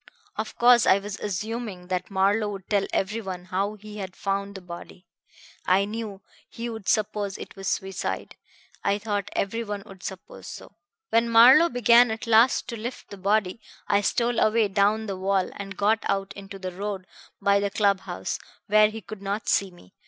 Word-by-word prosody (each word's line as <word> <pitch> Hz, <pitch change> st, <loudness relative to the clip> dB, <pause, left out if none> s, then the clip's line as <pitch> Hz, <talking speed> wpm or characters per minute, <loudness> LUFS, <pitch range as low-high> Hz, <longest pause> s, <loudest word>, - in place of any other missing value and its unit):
Of 220 Hz, -, -5 dB
course 240 Hz, -1 st, +6 dB
I 190 Hz, -, +6 dB
was 200 Hz, +1 st, -6 dB
assuming 210 Hz, -1 st, -4 dB
that 185 Hz, -1 st, -2 dB
Marlowe 200 Hz, +2 st, +2 dB
would 195 Hz, -3 st, -7 dB
tell 200 Hz, -2 st, +1 dB
everyone 190 Hz, -3 st, -2 dB
how 195 Hz, +3 st, -1 dB
he 210 Hz, 0 st, -11 dB
had 190 Hz, -2 st, -6 dB
found 200 Hz, 0 st, -2 dB
the 190 Hz, -, -7 dB
body. 180 Hz, +1 st, -10 dB, 0.6 s
I 190 Hz, +2 st, +4 dB
knew 210 Hz, -2 st, -6 dB, 0.3 s
he 235 Hz, +1 st, -5 dB
would 220 Hz, -3 st, -5 dB
suppose 205 Hz, -2 st, 0 dB
it -, -, -9 dB
was 195 Hz, -1 st, -6 dB
suicide; 190 Hz, 0 st, -3 dB, 0.5 s
I 200 Hz, 0 st, +2 dB
thought 205 Hz, -2 st, -3 dB
everyone 205 Hz, 0 st, -2 dB
would 195 Hz, -3 st, -13 dB
suppose 190 Hz, 0 st, -8 dB
so. -, -, -10 dB, 0.4 s
"When 230 Hz, +1 st, +3 dB
Marlowe 255 Hz, +9 st, +8 dB
began 240 Hz, 0 st, +5 dB
at 220 Hz, +2 st, -4 dB
last 230 Hz, +3 st, +4 dB
to 235 Hz, -, -4 dB
lift 235 Hz, +4 st, -7 dB
the 200 Hz, -, -8 dB
body, 200 Hz, +1 st, 0 dB, 0.3 s
I 200 Hz, 0 st, +3 dB
stole 235 Hz, +3 st, +1 dB
away 215 Hz, -1 st, +3 dB
down 205 Hz, +2 st, +2 dB
the 195 Hz, -3 st, -4 dB
wall 190 Hz, 0 st, 0 dB
and 195 Hz, -1 st, -7 dB
got 215 Hz, +2 st, +3 dB
out 195 Hz, 0 st, -1 dB
into 200 Hz, 0 st, -9 dB
the 185 Hz, -1 st, -5 dB
road 195 Hz, 0 st, -5 dB, 0.3 s
by 200 Hz, 0 st, +3 dB
the 200 Hz, 0 st, 0 dB
club 200 Hz, -1 st, +2 dB
house, -, -, -5 dB, 0.3 s
where 215 Hz, 0 st, +5 dB
he 220 Hz, +1 st, -7 dB
could 215 Hz, -2 st, -9 dB
not 200 Hz, +2 st, -3 dB
see 195 Hz, -, +2 dB
me. 175 Hz, -, -19 dB
200 Hz, 180 wpm, -25 LUFS, 195-220 Hz, 0.6 s, Marlowe